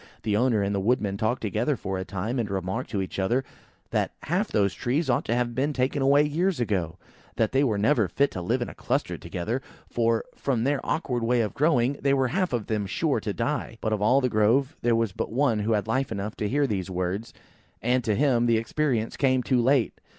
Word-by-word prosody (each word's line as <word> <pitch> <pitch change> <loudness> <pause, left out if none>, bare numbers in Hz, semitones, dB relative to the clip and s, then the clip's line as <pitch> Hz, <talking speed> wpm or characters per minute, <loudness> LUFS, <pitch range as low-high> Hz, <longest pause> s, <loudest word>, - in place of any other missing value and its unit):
The 105 -2 0
owner 115 -2 +2
and 100 +1 -1
the 100 - 0
woodman 105 -1 +1
talked 110 +5 -1
together 115 +8 0
for 95 0 -3
a - - -2
time, 100 +7 -3
and 110 -3 -1
remarked 95 +6 -3
to 100 -4 -1
each 95 - -6
other 120 +8 +1 0.5
that - - 0
half 185 +7 0
those 100 - +1
trees 135 - 0
ought 120 - 0
to 115 - 0
have 120 -1 0
been 140 +5 0
taken 135 +2 0
away 140 +2 +5
years 170 +4 0
ago: 95 -8 -1 0.4
that 110 -2 +1
they 135 +1 +3
were 110 -7 +1
never 110 0 +3
fit 140 +10 +1
to 90 - -5
live 120 +8 0
in - - -6
a - - -9
cluster - - -2
together; 110 +9 -4 0.3
for, 115 -1 +1
from 125 -5 -1
their 140 +1 0
awkward 125 -7 -1
way 120 +1 +2
of 105 - -2
growing, 140 -3 +2
they 140 0 +3
were 130 -2 +1
half 185 +6 0
of 120 -4 -1
them 105 -2 -2
sure - - 0
to - - -3
die. 115 - -2
But 110 - -1
of 105 - -1
all 125 +6 +4
the 125 - +2
Grove 120 +7 +2
there 120 -1 +2
was 115 -3 +1
but - - -4
one 120 -3 +2
who 110 +2 +1
had 105 -1 0
life 130 +3 -1
enough 105 0 -4
to 105 - -1
hear 145 +4 +2
these 95 -7 -2
words; 95 +4 -3 0.5
and 125 +3 +1
to 110 -2 +1
him 125 -3 +2
the 115 -1 +4
experience 115 -1 -1
came 130 -2 +2
too 125 -1 +2
late. 130 0 +2
120 Hz, 230 wpm, -26 LUFS, 105-135 Hz, 0.5 s, away